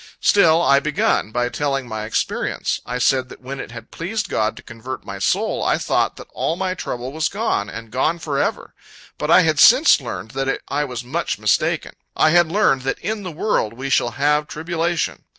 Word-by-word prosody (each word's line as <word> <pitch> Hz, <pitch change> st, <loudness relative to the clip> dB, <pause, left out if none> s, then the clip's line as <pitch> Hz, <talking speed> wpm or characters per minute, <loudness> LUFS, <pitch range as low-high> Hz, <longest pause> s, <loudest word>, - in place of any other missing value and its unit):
Still 170 Hz, -4 st, +4 dB
I 140 Hz, -3 st, +5 dB
begun, 145 Hz, -6 st, 0 dB
by 120 Hz, +2 st, 0 dB
telling 135 Hz, +1 st, -2 dB
my 110 Hz, -2 st, -4 dB
experience. 110 Hz, -, -2 dB
I 125 Hz, -, -2 dB
said 130 Hz, +1 st, +2 dB
that -, -, -12 dB
when 130 Hz, +2 st, -7 dB
it -, -, -6 dB
had 120 Hz, -1 st, -11 dB
pleased 205 Hz, +4 st, -3 dB
God 110 Hz, 0 st, 0 dB
to -, -, -11 dB
convert 115 Hz, +3 st, -8 dB
my -, -, -7 dB
soul, -, -, 0 dB
I -, -, +2 dB
thought -, -, 0 dB
that -, -, -10 dB
all 165 Hz, -, -1 dB
my 185 Hz, 0 st, -2 dB
trouble 125 Hz, -7 st, -5 dB
was 155 Hz, +2 st, -1 dB
gone, 200 Hz, -, -1 dB
and 115 Hz, 0 st, -9 dB
gone 155 Hz, +7 st, +1 dB
forever; 150 Hz, -4 st, -2 dB, 0.5 s
but -, -, -2 dB
I -, -, +7 dB
had -, -, +1 dB
since -, -, +7 dB
learned 110 Hz, -, -6 dB
that 135 Hz, 0 st, -1 dB
I 145 Hz, +1 st, 0 dB
was 125 Hz, -3 st, -6 dB
much 155 Hz, +8 st, -2 dB
mistaken 105 Hz, -1 st, 0 dB, 0.2 s
I 155 Hz, -, +4 dB
had 170 Hz, -1 st, +4 dB
learned 195 Hz, -9 st, +3 dB
that 135 Hz, +1 st, -2 dB
"in 215 Hz, +3 st, -3 dB
the 185 Hz, -3 st, -6 dB
world 150 Hz, -, -1 dB
we 135 Hz, +3 st, -5 dB
shall 120 Hz, -3 st, +2 dB
have 150 Hz, +1 st, +2 dB
tribulation." 170 Hz, +1 st, -2 dB
140 Hz, 200 wpm, -21 LUFS, 125-165 Hz, 0.5 s, I